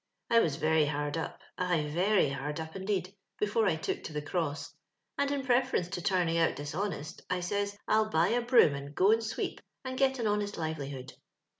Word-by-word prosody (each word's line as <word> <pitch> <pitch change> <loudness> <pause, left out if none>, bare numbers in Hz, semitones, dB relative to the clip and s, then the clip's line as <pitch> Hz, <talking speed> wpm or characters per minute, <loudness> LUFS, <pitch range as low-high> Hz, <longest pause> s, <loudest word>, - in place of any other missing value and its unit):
"I 230 - +7
was 160 -10 +2
very 155 0 +3
hard 145 0 -2
up 165 - -4
— - - -55
ay, 165 -4 +2
very 185 -2 +3
hard 145 +3 -4
up 160 0 -6
indeed 190 -1 -2
— - - -52
before 210 +1 +2
I 175 - +3
took 160 - -3
to 160 - -6
the 150 - -2
cross, 155 -1 -2 0.4
and, 280 0 +1
in 280 -1 -1
preference 250 -8 +2
to 185 -2 -4
tiuning 175 -3 +1
out 165 - +3
dishonest, 155 +1 -4
I 180 0 0
says, 200 +3 -2
I'll 215 0 +3
buy 165 -1 +3
a 240 +2 +2
broom 240 - +5
and 140 +1 -7
go 195 +3 +5
and 225 +1 +3
sweep 220 - -3 0.2
and 260 0 -3
get 265 -1 +3
a 235 - -2
honest 205 -1 0
livelihood. 140 -5 -4
180 Hz, 205 wpm, -31 LUFS, 155-215 Hz, 0.4 s, I